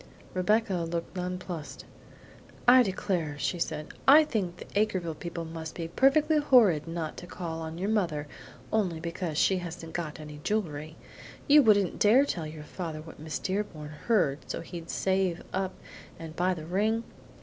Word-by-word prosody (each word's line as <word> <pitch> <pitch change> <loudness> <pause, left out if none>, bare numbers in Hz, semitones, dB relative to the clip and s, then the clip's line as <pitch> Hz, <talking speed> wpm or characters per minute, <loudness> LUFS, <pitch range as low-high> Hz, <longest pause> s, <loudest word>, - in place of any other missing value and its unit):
Rebecca 205 +2 +2
looked 170 +1 -3
nonplussed. 180 -3 -5 0.8
"I 255 +1 +9
declare," 185 -7 -1
she 175 +4 -1
said, 155 -2 -3 0.2
"I 295 +4 +9
think 195 - -2
the - - -9
Acreville 190 -6 +1
people 170 -1 -5
must 160 -1 -7
be 165 -1 -4
perfectly 300 - +4
horrid 215 - +5
not 165 -2 -4
to 175 - -8
call 165 -3 -5
on 160 0 -6
your 190 +3 -2
mother 165 -9 0 0.5
only 185 -7 +1
because 170 -1 -4
she 190 - +4
hasn't 170 -2 -7
got 160 -3 -4
any 150 -1 -9
jewelry. 160 -7 -2 0.5
You 295 +1 +8
wouldn't 205 -6 +3
dare 240 +7 +6
tell 170 - -3
your 155 0 -8
father 160 -1 -5
what 160 - -12
Miss 155 0 -4
Dearborn 185 -6 -3 0.2
heard, 180 -12 +3
so - - -3
he'd 165 0 -8
save 190 -2 0
up 190 0 -1 0.4
and 165 -1 -8
buy 180 +2 +1
the 155 -2 -7
ring?" 215 +6 +1
175 Hz, 160 wpm, -29 LUFS, 160-205 Hz, 0.8 s, I